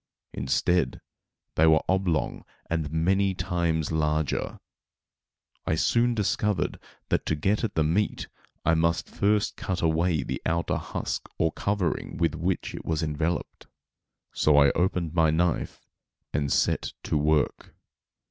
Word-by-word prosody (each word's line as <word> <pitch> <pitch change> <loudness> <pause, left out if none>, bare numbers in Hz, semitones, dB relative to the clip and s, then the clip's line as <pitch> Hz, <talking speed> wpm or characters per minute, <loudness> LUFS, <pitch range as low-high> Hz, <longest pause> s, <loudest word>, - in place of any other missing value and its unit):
Instead, 75 +7 +1 0.5
they 80 - +4
were 80 -1 +5
oblong 95 -4 0 0.3
and 80 -3 -1
many 95 +4 +2
times 85 -3 -1
larger. 75 -2 -1 1.1
I - - +2
soon 120 +8 +2
discovered 105 -1 0 0.3
that - - +1
to 80 - +1
get 100 +9 0
at 115 - -2
the 80 - +3
meat 90 +7 0 0.4
I 80 - +4
must 85 +1 +1
first 105 0 +1
cut 90 -2 -3
away 80 -2 +2
the - - -4
outer 85 0 0
husk - - -4
or 80 0 +2
covering 100 -3 -2
with 85 -2 +1
which 85 +3 -2
it - - -7
was 80 0 -1
enveloped; 80 +2 -2 0.7
so 75 -1 +3
I 70 -1 +6
opened 90 -3 0
my 80 -2 +4
knife 85 +2 0 0.5
and 70 -1 0
set - - +1
to - - -2
work. 75 0 +1
80 Hz, 135 wpm, -27 LUFS, 80-90 Hz, 1.1 s, I